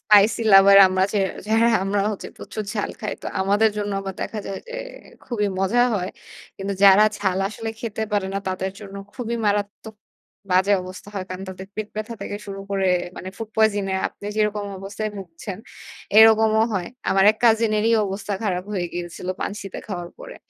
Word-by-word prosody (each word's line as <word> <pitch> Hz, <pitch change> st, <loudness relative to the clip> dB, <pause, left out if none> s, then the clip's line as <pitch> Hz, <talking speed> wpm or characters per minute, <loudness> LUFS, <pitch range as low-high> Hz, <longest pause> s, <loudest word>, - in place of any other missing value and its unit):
Spicy 210 Hz, +2 st, +5 dB
লাভার 195 Hz, 0 st, +9 dB
আমরা 185 Hz, 0 st, +2 dB
যে 210 Hz, -, +1 dB, 0.3 s
যারা 225 Hz, +2 st, +3 dB, 0.2 s
আমরা 200 Hz, +1 st, 0 dB
হচ্ছে 200 Hz, -, -7 dB
প্রচুর 215 Hz, -, -6 dB
ঝাল 205 Hz, -, -2 dB
খাই। 215 Hz, -, -3 dB
তো -, -, -5 dB
আমাদের 205 Hz, +3 st, +3 dB
জন্য 205 Hz, -1 st, -2 dB
আবার 195 Hz, -1 st, -6 dB
দেখা 220 Hz, -, -4 dB
যায় 195 Hz, -, -4 dB
যে 485 Hz, -, -7 dB, 0.5 s
খুবই 210 Hz, -4 st, -1 dB
মজা 195 Hz, +6 st, +2 dB
হয়। 185 Hz, -2 st, -2 dB, 0.5 s
কিন্তু 195 Hz, +1 st, -3 dB
যারা 200 Hz, +2 st, +8 dB
ঝাল 190 Hz, -2 st, 0 dB
আসলে 225 Hz, +2 st, -6 dB
খেতে 220 Hz, -1 st, -4 dB
পারে 205 Hz, -2 st, +1 dB
না -, -, +1 dB
তাদের 185 Hz, +1 st, -2 dB
জন্য 200 Hz, -2 st, -10 dB, 0.2 s
খুবই 235 Hz, -2 st, -3 dB
মারাত্মক 205 Hz, +2 st, -2 dB, 0.6 s
বাজে 190 Hz, +2 st, +4 dB
অবস্থা 185 Hz, +2 st, -10 dB
হয়। 190 Hz, -2 st, -3 dB
কারণ 185 Hz, +1 st, -6 dB
তাদের 190 Hz, 0 st, -8 dB
পেট 215 Hz, -1 st, -4 dB
ব্যথা 215 Hz, +2 st, -4 dB
থেকে 205 Hz, -, -4 dB
শুরু 195 Hz, -1 st, -6 dB
করে 195 Hz, -1 st, +1 dB, 0.3 s
মানে 185 Hz, -, -6 dB
ফুড 225 Hz, 0 st, -6 dB
পয়জন 215 Hz, -2 st, +3 dB
এ -, -, 0 dB
আপনি -, -, -16 dB
যেরকম 210 Hz, -1 st, 0 dB
অবস্থায় 205 Hz, +3 st, -4 dB
ভুগছেন 185 Hz, 0 st, -8 dB, 0.6 s
এরকমও 220 Hz, 0 st, +6 dB
হয়। 180 Hz, -3 st, -1 dB, 0.2 s
আমার 195 Hz, 0 st, +4 dB
এক -, -, -20 dB
কাজিন 225 Hz, -1 st, +4 dB
এরই 225 Hz, +2 st, +2 dB
অবস্থা 195 Hz, +2 st, -4 dB
খারাপ 185 Hz, -4 st, -1 dB
হয়ে 185 Hz, -3 st, -1 dB
গিয়েছিল 175 Hz, +1 st, -6 dB
পানসিতে 200 Hz, -1 st, -5 dB
খাওয়ার 175 Hz, -4 st, -5 dB
পরে। -, -, -10 dB
205 Hz, 180 wpm, -23 LUFS, 190-215 Hz, 0.6 s, লাভার